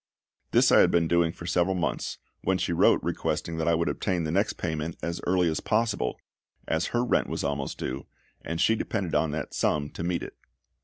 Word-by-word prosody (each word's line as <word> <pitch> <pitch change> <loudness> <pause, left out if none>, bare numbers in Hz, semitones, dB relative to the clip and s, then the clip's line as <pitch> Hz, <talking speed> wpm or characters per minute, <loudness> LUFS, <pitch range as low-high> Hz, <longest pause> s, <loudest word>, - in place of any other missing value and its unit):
This - - +4
I - - +7
had - - +6
been 85 -1 +2
doing 85 0 +3
for 85 - -10
several 90 +2 +1
months, 90 - -2 0.3
when 95 0 +2
she 90 - -1
wrote - - +4
requesting 80 0 -2
that 80 - -1
I 85 - +4
would 85 +1 0
obtain 90 -4 -1
the 80 - -2
next 100 +5 +1
payment 80 -1 -3
as 85 0 -3
early 90 -1 +3
as 80 -1 0
possible, 115 +1 0 0.5
as 80 +1 0
her 120 +1 0
rent 120 - +1
was - - -3
almost 70 -1 -2
due, 65 +2 -4 0.3
and 80 0 -4
she 110 - +4
depended 95 -6 -2
upon 80 - +2
that 75 +1 -4
sum 75 -1 0
to - - -7
meet 85 0 -1
it. - - -8
85 Hz, 210 wpm, -27 LUFS, 80-90 Hz, 0.5 s, I